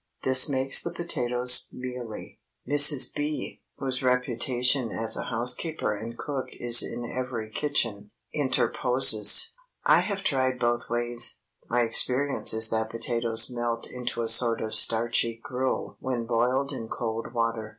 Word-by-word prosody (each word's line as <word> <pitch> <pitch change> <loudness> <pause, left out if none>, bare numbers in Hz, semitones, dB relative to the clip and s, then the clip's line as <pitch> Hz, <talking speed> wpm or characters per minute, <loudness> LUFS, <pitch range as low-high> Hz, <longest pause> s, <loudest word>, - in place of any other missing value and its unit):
This 130 +2 +5
makes 135 0 +2
the 170 - -5
potatoes 125 -7 +2
mealy." 125 -3 -9 0.3
Mrs. 145 0 +7
B., 150 +1 -6 0.2
whose 130 -2 -3
reputation 125 0 -1
as 110 0 -2
a - - -5
housekeeper 125 +1 -2
and 115 +3 -9
cook 140 -3 -6
is 120 -1 +6
in 120 - -5
every 120 -3 -6
kitchen, 115 -8 -3 0.2
interposes:—"I 130 - +2
have 195 +2 -4
tried 130 -5 -1
both 120 -1 -3
ways. 120 0 -2 0.3
My 120 +1 0
experience 130 +4 0
is 110 0 +1
that 110 0 -2
potatoes 115 0 -1
melt 120 -1 -4
into 125 -1 -5
a - - -4
sort 115 +1 +4
of 110 - -6
starchy 115 0 +2
gruel 130 +1 -5
when 125 -3 -5
boiled 125 +4 -1
in 120 -5 -8
cold 115 0 -6
water. 115 -2 -3
120 Hz, 135 wpm, -25 LUFS, 115-130 Hz, 0.3 s, Mrs